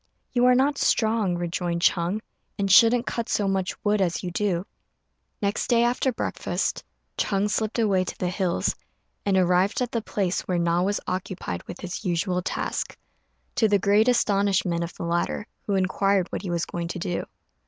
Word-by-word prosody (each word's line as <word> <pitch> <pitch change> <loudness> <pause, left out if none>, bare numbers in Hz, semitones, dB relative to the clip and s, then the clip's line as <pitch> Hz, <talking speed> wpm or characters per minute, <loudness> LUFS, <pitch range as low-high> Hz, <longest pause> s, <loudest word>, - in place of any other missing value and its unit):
"You 245 -1 +3
are 250 - +6
not 275 +2 +2
strong," 215 -5 +2
rejoined 175 0 -2
Ch'êng, 180 +5 +2 0.4
"and 195 -1 0
shouldn't 230 +5 +6
cut 235 -1 -3
so 205 - +1
much 190 -1 -1
wood 205 0 +2
as 175 -1 0
you 180 - -3
do." 185 -1 0 0.8
Next 200 +2 0
day, 235 -1 +4
after 245 +2 +1
breakfast, - - -2 0.4
Ch'êng 200 0 +1
slipped 215 +2 -1
away 200 -5 +2
to - - -6
the 180 - -1
hills, 180 -1 0 0.5
and 195 -1 +3
arrived 180 +2 +3
at 245 -2 -1
the 230 - -1
place 195 -4 -1
where 180 - 0
Na 170 0 +2
was 200 +2 0
occupied 180 - -4
with - - -8
his 185 +2 -5
usual 180 0 0
task, - - -3 0.6
to 220 - +3
the 205 -1 +4
great 205 +3 +3
astonishment 195 -7 +2
of 170 - -5
the - - -6
latter, 170 +4 -1 0.2
who 200 - +1
inquired 190 0 +1
what - - -3
he 190 - -5
was 170 -1 0
going 170 -1 -4
to 170 - -5
do. 175 0 -2
195 Hz, 180 wpm, -25 LUFS, 175-210 Hz, 0.8 s, are